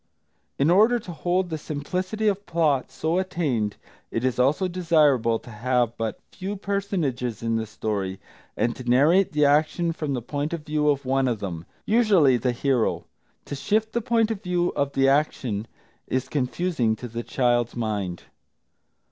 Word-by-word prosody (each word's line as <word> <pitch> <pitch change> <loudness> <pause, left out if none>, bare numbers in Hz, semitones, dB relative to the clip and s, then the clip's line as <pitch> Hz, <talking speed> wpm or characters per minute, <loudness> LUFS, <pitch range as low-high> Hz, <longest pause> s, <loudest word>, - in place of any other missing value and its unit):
In 145 +4 +3
order 220 +6 +5
to 210 -6 -8
hold 175 +2 -1
the 160 - -2
simplicity 185 +9 -3
of 200 0 0
plot 155 -6 +1
so 160 +7 -1
attained, 145 - -1 0.3
it 115 +2 -2
is 130 -1 0
also 145 +9 +3
desirable 150 -10 +3
to 120 - -13
have 120 +1 0
but 115 -1 -3
few 195 +2 -5
personages 175 - -2
in 115 0 0
the 110 -1 -2
story, 100 -3 -3 0.4
and 120 - +1
to 130 - -8
narrate 165 +10 +4
the 150 0 +3
action 155 +4 +2
from 155 -3 -3
the 125 - -3
point 145 +5 -3
of 160 -3 -5
view 150 -1 +1
of 140 -1 0
one 135 0 +2
of 120 -4 -1
them, 85 -5 -5 0.2
usually 205 - +4
the 125 +1 0
hero. 125 -1 0 0.4
To - - -7
shift 215 +9 0
the 235 - 0
point 230 -1 +2
of 210 -3 -4
view 180 -2 0
of 140 0 -1
the 135 0 +3
action 130 -7 0 0.4
is 130 -1 -1
confusing 130 -3 0
to 125 - -7
the 115 0 -5
child's 120 -1 +1
mind. 105 -6 -3
145 Hz, 170 wpm, -25 LUFS, 120-180 Hz, 0.4 s, order